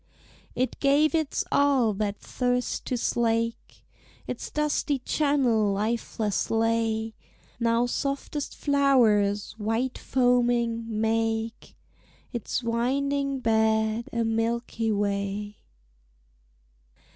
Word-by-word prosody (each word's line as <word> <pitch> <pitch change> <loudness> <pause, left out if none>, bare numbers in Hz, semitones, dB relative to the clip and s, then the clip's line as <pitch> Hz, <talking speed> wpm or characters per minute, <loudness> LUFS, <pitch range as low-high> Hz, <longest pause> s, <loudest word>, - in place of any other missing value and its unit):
It 255 +1 -1
gave 290 +3 +3
its 315 -3 0
all 270 -6 +3
that 205 0 -2
thirst 250 0 -2
to 250 - -1
slake; 230 0 -1 0.4
Its - - -5
dusty 300 -1 0
channel 255 -6 +1
lifeless 215 0 -1
lay; 225 0 0 0.5
Now 230 0 +2
softest 275 +3 -3
flowers, 230 -8 +3
white 225 +4 -1
foaming, 240 -2 +1
make 225 +1 -1 0.6
Its 240 +1 -3
winding 275 +4 0
bed 220 0 +1
a 235 0 0
Milky 225 0 -1
Way. 205 0 -2
230 Hz, 85 wpm, -26 LUFS, 220-260 Hz, 0.6 s, gave